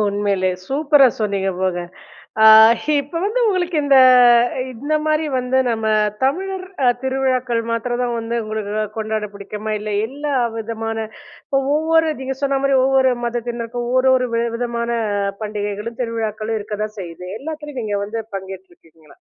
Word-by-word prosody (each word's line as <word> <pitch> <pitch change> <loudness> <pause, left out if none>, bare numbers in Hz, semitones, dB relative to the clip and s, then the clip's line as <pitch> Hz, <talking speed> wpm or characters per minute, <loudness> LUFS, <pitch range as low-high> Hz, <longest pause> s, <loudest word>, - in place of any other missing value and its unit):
உண்மையிலே. 200 -2 0 0.2
சூப்பரா 285 +1 +4
சொன்னீங்க 200 -2 -1
போங்க. 185 -2 -1 0.6
ஆ - - +6 0.6
இப்ப 290 +4 -12
வந்து 435 +5 0
உங்களுக்கு 360 -3 0
இந்த 275 -1 +5 0.8
இந்தமாரி 305 +4 0
வந்து 250 +1 0
நம்ம 225 -1 -2 0.4
தமிழர் 375 +6 -1 0.2
அ - - +5
திருவிழாக்கள் 260 -3 0
மாத்திரந்தான் 240 +1 -1
வந்து 230 +1 -4
உங்களுக்கு 215 -1 -4 0.2
கொண்டாட 215 -1 -2
பிடிக்குமா? 210 +2 -5
இல்ல 210 0 -5 0.2
எல்லா 285 +3 -4 0.2
விதமான 225 0 -4 0.6
ஒ - - +4 0.2
ஒவ்வொரு 320 +1 +2
நீங்க 265 0 -3
சொன்னமாரி 275 0 +1
ஒவ்வொரு 265 -1 +3
மதத்தினருக்கும் 240 0 -4
ஒரு, 255 - +3
ஒரு 255 -1 0
வி 230 - +1
விதமான 235 -1 -3 0.5
பண்டிகைகளும், 210 +2 -4
திருவிழாக்களும் 225 -1 -3
இருக்கதான் 210 +1 -5
செய்யுது. 175 0 -8
எல்லாத்துலயும் 295 -3 -6
நீங்க 205 -1 -2
வந்து 225 +2 -4
பங்கேற்றுருக்கீங்களா? 180 -5 -11
235 Hz, 125 wpm, -19 LUFS, 210-270 Hz, 0.8 s, ஆ